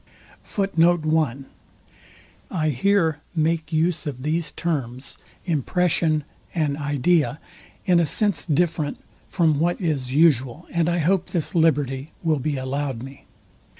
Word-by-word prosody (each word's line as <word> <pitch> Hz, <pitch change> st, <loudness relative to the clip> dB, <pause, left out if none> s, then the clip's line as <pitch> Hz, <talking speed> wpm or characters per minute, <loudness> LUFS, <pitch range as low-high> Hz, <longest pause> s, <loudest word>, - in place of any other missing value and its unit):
I 155 Hz, -4 st, 0 dB
here 165 Hz, +1 st, +2 dB, 0.2 s
make 160 Hz, 0 st, 0 dB
use 165 Hz, +1 st, 0 dB
of 130 Hz, -3 st, -5 dB
these 155 Hz, +1 st, -1 dB
terms, 135 Hz, -6 st, -3 dB, 0.3 s
impression 160 Hz, -1 st, +1 dB, 0.3 s
and 150 Hz, -4 st, +1 dB
idea, 145 Hz, +2 st, +1 dB, 0.5 s
in 180 Hz, -2 st, +4 dB
a 165 Hz, -, +2 dB
sense 205 Hz, +6 st, +2 dB
different 155 Hz, -1 st, 0 dB, 0.3 s
from 160 Hz, -5 st, +2 dB
what 175 Hz, +2 st, +1 dB
is 145 Hz, -8 st, -1 dB
usual, 145 Hz, 0 st, +3 dB
and 170 Hz, -1 st, +1 dB
I 175 Hz, -, +1 dB
hope 175 Hz, +3 st, +1 dB
this 170 Hz, -4 st, -2 dB
liberty 145 Hz, -4 st, +1 dB
will 155 Hz, -3 st, +2 dB
be 145 Hz, +1 st, -2 dB
allowed 130 Hz, -2 st, -3 dB
me. 135 Hz, +1 st, -11 dB
155 Hz, 115 wpm, -23 LUFS, 140-170 Hz, 0.5 s, in